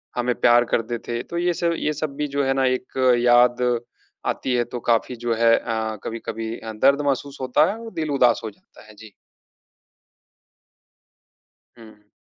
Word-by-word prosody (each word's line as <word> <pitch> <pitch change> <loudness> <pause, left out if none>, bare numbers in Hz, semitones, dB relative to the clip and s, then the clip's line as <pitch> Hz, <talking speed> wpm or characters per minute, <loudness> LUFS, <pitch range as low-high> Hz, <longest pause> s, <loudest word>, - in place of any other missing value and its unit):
हमें 125 0 0
प्यार 120 0 +5
करते 120 +1 -1
थे। 120 0 -2
तो 170 - -6
ये 175 0 +1
सब 170 0 0
ये 150 - -1
सब 150 -1 -4
भी 150 +1 -2
जो 140 0 -1
है 135 - +2
ना 135 0 +1
एक 130 0 -2 0.3
याद 120 0 +4 0.7
आती 130 - -1
है 120 - +2
तो 120 +1 -7
काफ़ी 115 +2 +1
जो 120 0 -2
है 115 0 +4
अ, 110 -2 -3
कभी-कभी 115 0 -5
अ, 110 -1 -7
दर्द 140 +6 +3
महसूस 140 0 -2
होता 130 +4 +3
है 215 - -6
और 225 -1 -9
दिल 155 -3 -3
उदास 125 -4 +3
हो 110 - -4
जाता 100 - -20
है। 110 - -14
जी। 110 0 -14 2.7
हुँ। 110 -2 -16
125 Hz, 175 wpm, -22 LUFS, 115-140 Hz, 2.7 s, प्यार